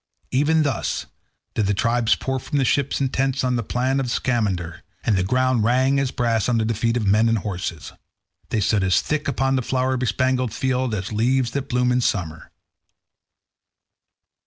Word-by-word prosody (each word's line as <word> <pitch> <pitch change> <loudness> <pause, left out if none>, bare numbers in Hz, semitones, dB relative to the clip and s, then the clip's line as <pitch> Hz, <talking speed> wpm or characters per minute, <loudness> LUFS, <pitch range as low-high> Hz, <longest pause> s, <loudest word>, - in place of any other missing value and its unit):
Even 155 +4 +3
thus 140 -4 -2 0.5
did 105 -3 0
their 100 - +1
tribes 115 +2 +2
pour 130 0 -3
from 140 +2 -1
ships 140 +2 +1
and 135 -2 -1
tents 135 0 0
on 125 - +1
to 125 - +1
the 115 - -2
plain 130 +5 0
of 135 - -1
the - - -4
Scamander, 100 - -1 0.2
and 110 - +2
the 95 - +1
ground 130 +2 +1
rang 130 +4 +2
as 135 -1 0
brass 115 -3 0
under 115 -2 +1
the 115 - 0
feet 115 +2 0
of 110 - -1
men 105 +3 +3
and 115 - +2
horses. 90 -5 -5 0.6
They 110 - 0
stood 100 0 +2
as 95 -1 +3
thick 150 0 -2
upon 135 -1 +1
the - - +1
flower 130 +1 0
bespangled 130 -1 0
field 130 -3 0
as 95 0 -4
leaves 120 +3 +1
that 140 +1 -4
bloom 125 -1 +1
in 125 0 +2
summer. 85 -8 -2
125 Hz, 185 wpm, -22 LUFS, 110-130 Hz, 0.6 s, Even